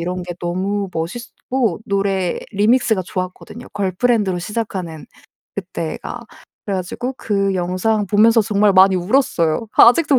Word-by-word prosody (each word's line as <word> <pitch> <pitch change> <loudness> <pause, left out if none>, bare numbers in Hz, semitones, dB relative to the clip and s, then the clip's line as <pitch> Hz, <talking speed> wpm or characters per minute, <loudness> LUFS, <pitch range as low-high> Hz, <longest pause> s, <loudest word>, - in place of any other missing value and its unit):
이런 180 +1 -3
게 175 - -6
너무 190 +3 -2
멋있었고 230 +4 -3
노래 195 -2 0
리믹스가 220 0 +2
좋았거든요 185 +6 -6
걸프렌드로 200 0 0
시작하는 185 -5 -5 0.5
그때가. - - -5 0.5
그래 200 -2 -1
가지고 235 +8 -4
그 195 -2 0
영상 185 +4 0
보면서 220 +3 +5
정말 205 -1 +2
많이 190 0 +6
울었어요. 180 - +1
아직도 280 +3 +6
200 Hz, 320 characters per minute, -19 LUFS, 180-225 Hz, 0.5 s, 많이